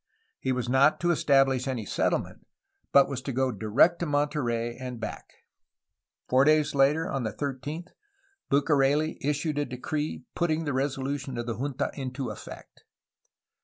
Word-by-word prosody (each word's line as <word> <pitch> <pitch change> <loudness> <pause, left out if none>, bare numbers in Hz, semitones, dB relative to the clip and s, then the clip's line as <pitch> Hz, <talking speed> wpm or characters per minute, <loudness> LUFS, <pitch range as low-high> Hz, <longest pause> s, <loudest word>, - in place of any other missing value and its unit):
He 130 - -1
was 125 -2 -1
not 135 +4 +4
to 175 0 +3
establish 135 -4 +3
any 125 -5 -2
settlement, - - -1 0.4
but 140 -1 +6
was 135 -2 -4
to 135 - -4
go 130 +1 +1
direct 110 - +3
to 170 - -2
Monterey 130 -6 0
and 125 -2 -7
back. - - -6 1.0
Four 130 +1 +4
days 155 0 +3
later, 145 +4 +3
on 135 - -2
the 110 -3 -2
13th, 145 - -5 0.6
Bucareli 145 +1 +2
issued 150 +1 -1
a 145 - 0
decree 150 +4 -4
putting 165 -1 0
the 145 -3 -2
resolution 135 0 -2
of 120 - -3
the 120 -1 -3
junta 140 -1 -2
into 130 -3 -4
effect. 105 - -11
135 Hz, 150 wpm, -27 LUFS, 130-150 Hz, 1.0 s, but